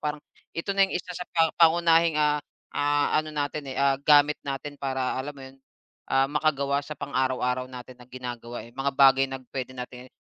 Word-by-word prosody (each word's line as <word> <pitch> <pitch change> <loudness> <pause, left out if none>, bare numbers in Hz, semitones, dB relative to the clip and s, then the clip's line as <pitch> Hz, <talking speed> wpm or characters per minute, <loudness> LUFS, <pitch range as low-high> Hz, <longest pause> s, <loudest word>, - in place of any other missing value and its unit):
parang, 150 0 -2 0.4
ito 180 +4 -2
na 195 - 0
yung - - -2
isa 180 0 -6
sa 180 0 -7
pa 165 -1 +2
pangunahing, 165 -1 +5
ah, 150 -1 +2 0.3
ah, 145 +1 +2
ano 155 - -8
natin, 145 -1 -3
eh, 130 - -6
ah, 140 0 +2
gamit 145 0 +5
natin. 140 +1 -5
Para 130 -2 -1
alam 145 +2 -6
mo 135 - -10
yun, 135 0 -14 0.5
ah, 135 0 +3
makagawa 140 -1 0
sa 150 +1 -8
pang-araw-araw 130 -2 -1
natin 125 0 -11
na 125 - -15
ginagawa, 120 -2 -7
eh. 120 - -15
Mga 135 +2 -2
bagay 135 0 +6
na 135 - -4
puwede 130 -1 -4
natin 125 0 -8
i - - -47
140 Hz, 200 wpm, -26 LUFS, 130-150 Hz, 0.5 s, bagay